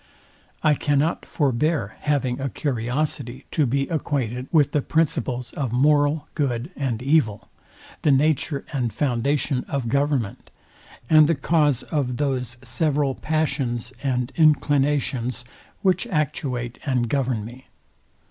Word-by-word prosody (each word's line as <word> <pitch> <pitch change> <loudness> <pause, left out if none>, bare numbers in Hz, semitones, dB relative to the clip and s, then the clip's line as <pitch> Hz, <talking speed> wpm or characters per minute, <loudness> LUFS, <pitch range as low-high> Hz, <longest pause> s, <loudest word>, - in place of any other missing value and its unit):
I 155 - +5
cannot 145 +3 0
forbear 150 +2 0
having 135 -4 0
a 135 - -1
curiosity 130 +1 -2
to 150 -4 +2
be 135 +3 0
acquainted 130 -6 -2
with 150 -5 +4
the 150 - +1
principles 135 -6 -1
of 135 -5 -2
moral 145 +3 +3
good 135 0 -1
and 125 -4 -2
evil, 135 -8 +1 0.5
the - - +2
nature 140 +1 +2
and 125 -5 0
foundation 135 0 0
of 135 -5 -2
government, 140 -5 -1 0.6
and 155 +1 +6
the 165 - +2
cause 145 -2 +2
of 130 -5 -2
those 130 -4 -1
several 145 -4 0
passions 130 -6 -1
and 125 -2 -1
inclinations, 140 -5 +2 0.4
which 190 +4 +2
actuate 130 - -2
and 125 -4 0
govern 125 -4 -1
me. 125 +3 -11
140 Hz, 120 wpm, -23 LUFS, 125-150 Hz, 0.6 s, and